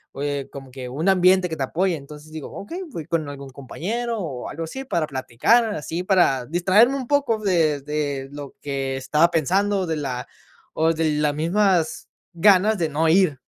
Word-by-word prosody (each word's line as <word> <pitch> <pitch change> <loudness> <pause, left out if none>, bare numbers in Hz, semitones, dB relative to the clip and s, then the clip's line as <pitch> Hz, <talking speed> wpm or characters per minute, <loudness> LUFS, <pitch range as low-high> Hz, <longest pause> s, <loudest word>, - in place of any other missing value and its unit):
eh, 140 0 -3
como 135 -1 -9
que 130 -1 -7
un 155 +9 0
ambiente 185 -1 +4
que 160 - -3
te 135 - -1
apoye. 175 +6 0
Entonces, 150 +1 -11
digo, 155 -2 -7
okey, 345 - -7
voy 245 - -7
con 160 -2 -1
algún 140 -1 -8
compañero 215 - -4
o 145 -10 -5
algo 165 - -5
así 265 +12 -6
para 170 -11 -1
platicar, 135 - +2
así 160 +3 -4
para 175 -10 +3
distraerme 190 - +3
un 260 -3 -4
poco 285 -6 +1
de 165 -8 +1
de 145 -2 -3
lo 145 -1 -9
que 135 -2 -3
estaba 150 +5 +2
pensando, 190 +5 +1
de 160 - -1
la 130 -4 -4 0.5
o 160 +1 +2
de 160 -1 0
las 150 0 +1
mismas 175 +1 +1 0.3
ganas 200 +4 +4
de 170 -3 0
no 160 +2 +1
ir. 165 -5 +3
160 Hz, 180 wpm, -23 LUFS, 145-190 Hz, 0.5 s, ambiente